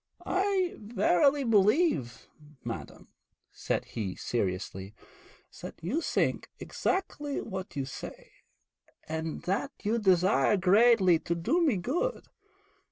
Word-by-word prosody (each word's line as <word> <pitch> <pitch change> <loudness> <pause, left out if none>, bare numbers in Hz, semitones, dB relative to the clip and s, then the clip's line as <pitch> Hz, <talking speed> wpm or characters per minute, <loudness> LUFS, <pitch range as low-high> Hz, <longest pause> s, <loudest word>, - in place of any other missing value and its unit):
'I 380 -2 0
verily 225 +6 +2
believe, 210 - +2 0.4
madam,' - - -7 0.4
said - - -2
he 100 -5 -5
seriously, 95 -2 -3 0.7
'that - - -7
you 250 - -1
think - - -1
exactly 295 -7 -2
what 190 -6 -6
you 140 -2 -2
say, 135 - -9 0.8
and 160 0 -4
that 195 +9 -1
you 220 +3 +1
desire 185 -3 +3
greatly 190 -2 +5
to 170 - -2
do 245 - +1
me 280 - +2
good. 340 - -2
195 Hz, 105 wpm, -29 LUFS, -, 0.8 s, greatly